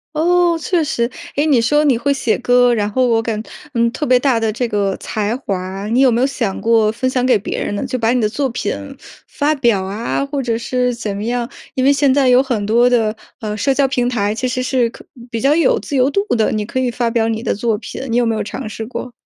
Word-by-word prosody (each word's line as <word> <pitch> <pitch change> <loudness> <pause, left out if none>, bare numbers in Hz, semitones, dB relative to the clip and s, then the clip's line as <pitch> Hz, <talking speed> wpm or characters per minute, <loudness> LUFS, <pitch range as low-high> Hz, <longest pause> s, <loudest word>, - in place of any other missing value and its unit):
哦， 345 +2 +3
确 350 -3 +1
实。 235 -5 -1 0.3
诶， 290 - +2
你 285 -6 +4
说 295 +6 +2
你 275 -5 +3
会 280 +4 +1
写 255 -5 0
歌， 245 0 +3
然 205 -2 0
后 255 +3 +2
我 230 -1 +3
感 220 -2 -3 0.3
嗯， 235 0 +2
特 295 - -3
别 250 0 +4
大 250 -3 +2
的 225 -1 0
这 235 +3 -2
个 200 -3 0
才 215 +1 -2
华， 195 -3 -4
你 240 +4 +2
有 260 -2 +5
没 235 - +1
有 265 - +3
想 240 -8 -3
过 225 -2 +3
分 250 +3 -1
享 255 -1 0
给 255 - +4
别 - - -4
人 - - -3
呢？ 200 - -3
就 255 0 -3
把 230 -1 +1
你 250 - +1
的 215 - +1
作 275 +5 -1
品 240 - -2 0.6
发 300 +1 0
表 235 -8 +1
啊， 210 +8 -2
或 280 0 -3
者 230 -2 0
是 250 +1 -1
怎 220 -4 -4
么 205 - -4
样， 240 +1 -2 0.2
因 260 - -1
为 275 - +5
现 280 -1 +3
在 270 -2 +3
有 250 +2 +5
很 240 -6 -2
多 240 +3 +4
的， 225 -3 +2 0.2
呃， 215 -3 -4
社 270 +6 +1
交 275 0 +2
平 245 -2 0
台 210 -4 0
其 255 +2 -2
实 255 0 -2
是 255 -2 +1
可 - - -14 0.3
比 230 - -3
较 280 +3 +3
有 455 +8 +3
自 285 - -5
由 260 0 +3
度 400 - +1
的， 220 -2 +1
你 215 -1 -1
可 260 +5 -3
以 255 -1 0
发 235 0 -1
表 230 -1 +1
你 225 -1 -2
的 - - -1
作 225 +1 0
品， - - -8
你 235 - +2
有 245 - +3
没 225 - 0
有 215 - -2
尝 215 +2 -6
试 220 +1 -6
过？ 250 +1 -6
240 Hz, 280 characters per minute, -17 LUFS, 225-265 Hz, 0.6 s, 有